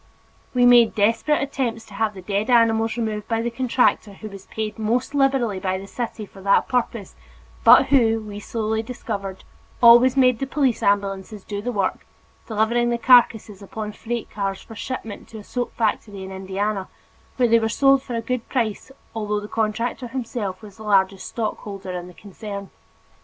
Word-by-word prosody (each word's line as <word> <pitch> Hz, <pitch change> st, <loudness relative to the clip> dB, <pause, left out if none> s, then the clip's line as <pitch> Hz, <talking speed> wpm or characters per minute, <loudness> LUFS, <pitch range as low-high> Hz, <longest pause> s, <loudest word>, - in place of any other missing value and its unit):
We 245 Hz, 0 st, +5 dB
made 240 Hz, -2 st, +6 dB
desperate 225 Hz, +8 st, +2 dB
attempts 250 Hz, -5 st, -3 dB
to 210 Hz, -, -15 dB
have 215 Hz, 0 st, -1 dB
the 190 Hz, -, -10 dB
dead 205 Hz, +4 st, -1 dB
animals 225 Hz, -1 st, +3 dB
removed 215 Hz, -3 st, -3 dB
by 225 Hz, 0 st, -1 dB
the 235 Hz, -, -2 dB
contractor 245 Hz, -4 st, +1 dB
who 215 Hz, +2 st, -9 dB
was 195 Hz, -1 st, -12 dB
paid 220 Hz, 0 st, -5 dB
most 235 Hz, +5 st, -1 dB
liberally 270 Hz, -8 st, +1 dB
by 185 Hz, 0 st, -1 dB
the 195 Hz, -, -8 dB
city 225 Hz, 0 st, -5 dB
for 195 Hz, -1 st, -15 dB
that 200 Hz, +1 st, +3 dB
purpose 235 Hz, -5 st, -2 dB, 0.5 s
but -, -, +8 dB
who, 230 Hz, -5 st, +4 dB
we 210 Hz, -1 st, -8 dB
slowly 220 Hz, +1 st, -2 dB
discovered, 200 Hz, -5 st, -6 dB, 0.4 s
always 245 Hz, +2 st, +7 dB
made 250 Hz, -3 st, +4 dB
the 270 Hz, -, -2 dB
police 270 Hz, -4 st, 0 dB
ambulances 200 Hz, 0 st, -1 dB
do 205 Hz, -1 st, -5 dB
the 245 Hz, +3 st, -3 dB
work, 200 Hz, -5 st, -1 dB, 0.4 s
delivering 230 Hz, +2 st, +1 dB
the 235 Hz, -, 0 dB
carcasses 230 Hz, -4 st, +4 dB
upon 210 Hz, +2 st, -6 dB
freight 235 Hz, +2 st, -5 dB
cars 195 Hz, -2 st, -3 dB
for 225 Hz, -, -12 dB
shipment 225 Hz, -3 st, -6 dB
to 225 Hz, -, -10 dB
a 210 Hz, -, -9 dB
soap 245 Hz, +3 st, -3 dB
factory 210 Hz, -3 st, -2 dB
in 190 Hz, -, -8 dB
Indiana 195 Hz, +1 st, -3 dB, 0.5 s
where 250 Hz, -1 st, +3 dB
they 230 Hz, 0 st, +5 dB
were 225 Hz, 0 st, 0 dB
sold 275 Hz, +3 st, +4 dB
for 250 Hz, -3 st, -6 dB
a 230 Hz, -, -1 dB
good 240 Hz, 0 st, -3 dB
price 230 Hz, -2 st, -2 dB, 0.2 s
although 210 Hz, -2 st, -2 dB
the 205 Hz, -, -8 dB
contractor 225 Hz, +3 st, -2 dB
himself 230 Hz, -6 st, -4 dB
was 205 Hz, -1 st, -12 dB
the 220 Hz, -, -11 dB
largest 195 Hz, -2 st, +1 dB
stockholder 200 Hz, -4 st, -5 dB
in 180 Hz, -1 st, -5 dB
the 180 Hz, -, -14 dB
concern. 200 Hz, 0 st, -8 dB
220 Hz, 180 wpm, -22 LUFS, 200-240 Hz, 0.5 s, but